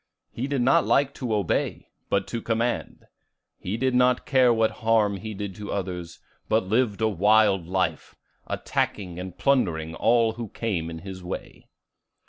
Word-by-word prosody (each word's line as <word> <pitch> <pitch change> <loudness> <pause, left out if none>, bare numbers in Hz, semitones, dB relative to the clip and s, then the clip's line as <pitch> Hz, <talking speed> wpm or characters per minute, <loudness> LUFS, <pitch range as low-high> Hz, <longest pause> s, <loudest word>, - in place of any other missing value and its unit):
He 125 +4 -3
did 140 -3 0
not 130 - +4
like 140 0 +2
to 125 -4 -4
obey, 105 -5 -1 0.2
but 100 -1 +1
to 115 - -3
command. 115 +2 -2 0.5
He 100 +5 -3
did 130 +1 +1
not 125 0 +3
care 130 -3 +4
what 110 -1 +2
harm 110 -3 +3
he 110 +3 -6
did 100 -1 -5
to 105 -1 -6
others, 90 -3 -4 0.3
but 110 -1 +3
lived 110 +1 0
a 110 - +4
wild 105 -2 +3
life, 95 +1 -2 0.3
attacking 90 -4 -2
and 90 -1 -7
plundering 85 - +1
all 115 +5 +3
who 115 -1 -6
came 95 -9 -2
in 80 - -6
his 95 -2 -8
way. 90 - -7
110 Hz, 160 wpm, -25 LUFS, 95-120 Hz, 0.5 s, not